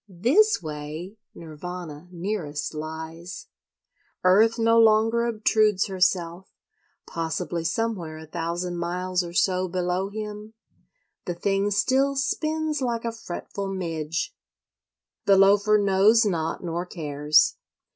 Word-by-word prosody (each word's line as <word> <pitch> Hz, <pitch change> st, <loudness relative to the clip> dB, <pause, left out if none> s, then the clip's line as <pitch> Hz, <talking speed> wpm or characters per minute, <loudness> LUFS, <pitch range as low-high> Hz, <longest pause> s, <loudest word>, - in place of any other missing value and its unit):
This 255 Hz, -, +3 dB
way 155 Hz, +5 st, -6 dB, 0.2 s
Nirvana 165 Hz, 0 st, -8 dB
nearest 170 Hz, -5 st, -4 dB
lies. 160 Hz, +4 st, -7 dB, 0.7 s
Earth 215 Hz, +6 st, +5 dB
no 230 Hz, 0 st, +4 dB
longer 225 Hz, +1 st, +4 dB
obtrudes 215 Hz, -3 st, +2 dB
herself; 185 Hz, -2 st, 0 dB, 0.6 s
possibly 165 Hz, +1 st, -3 dB
somewhere 170 Hz, -3 st, -2 dB
a 160 Hz, -, -10 dB
thousand 170 Hz, +2 st, -3 dB
miles 180 Hz, +1 st, -1 dB
or 170 Hz, 0 st, -8 dB
so 185 Hz, -1 st, +1 dB
below 180 Hz, +2 st, -1 dB
him 210 Hz, +1 st, -7 dB, 0.7 s
the 175 Hz, -, -3 dB
thing 195 Hz, +3 st, 0 dB
still 265 Hz, +7 st, +2 dB
"spins 310 Hz, +2 st, -1 dB
like 235 Hz, -2 st, -2 dB
a 230 Hz, -, -1 dB
fretful 200 Hz, -2 st, -6 dB
midge." 165 Hz, -4 st, -3 dB, 0.9 s
The 195 Hz, -1 st, +6 dB
Loafer 205 Hz, +2 st, +5 dB
knows 205 Hz, +3 st, +4 dB
not 165 Hz, -5 st, -2 dB
nor 170 Hz, 0 st, -2 dB
cares. 150 Hz, -, +2 dB
185 Hz, 110 wpm, -25 LUFS, 170-215 Hz, 0.9 s, The